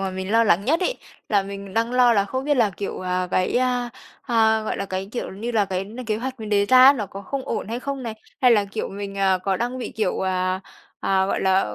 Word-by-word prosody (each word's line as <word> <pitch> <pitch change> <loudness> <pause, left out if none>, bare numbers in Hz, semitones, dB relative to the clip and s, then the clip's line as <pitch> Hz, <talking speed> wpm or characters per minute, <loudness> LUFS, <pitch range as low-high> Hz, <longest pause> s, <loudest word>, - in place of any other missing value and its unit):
mà 195 -1 -2
mình 190 +1 -5
lo 230 0 +5
lắng 200 -1 +3
nhất 315 +6 +2
ấy, 440 +7 -1 0.3
là 205 -2 +3
mình 200 0 -8
đang 230 +2 0
lo 250 -1 +5
là 200 -2 +3
không 260 +6 -4
biết 290 0 +2
là, 220 -4 +3
kiểu, 200 - -4
à, 180 0 -1
cái, 185 +6 +1
à, 250 -1 0 0.3
à, 220 -2 +2
gọi 215 - -3
là, - - -3
cái, 190 0 -4
kiểu 245 - -4
như 220 +5 -4
là, 210 -3 +3
cái 190 0 -3
n 235 +5 -8
kế 215 -1 -1
hoạch 255 +1 -5
mình 215 - -6
đề 200 -1 +3
ra 255 +2 +7
á, 275 - +9
nó 215 -7 -3
có 195 +1 -9
không 270 +6 -4
ổn - - -3
hay 235 +2 -3
không 275 -1 -4
này? 230 -2 -4 0.3
Hay 250 - +5
là 210 -3 +4
kiểu 200 +2 -4
mình, 200 0 -6
à, 190 -1 +3
có 190 0 -1
đang 245 +2 -3
bị, 250 - -5
kiểu, 220 -4 -1
à, 185 0 0 0.4
à, 190 0 +2
gọi - - -1
là, 190 - +2
210 Hz, 270 wpm, -23 LUFS, 195-245 Hz, 0.4 s, á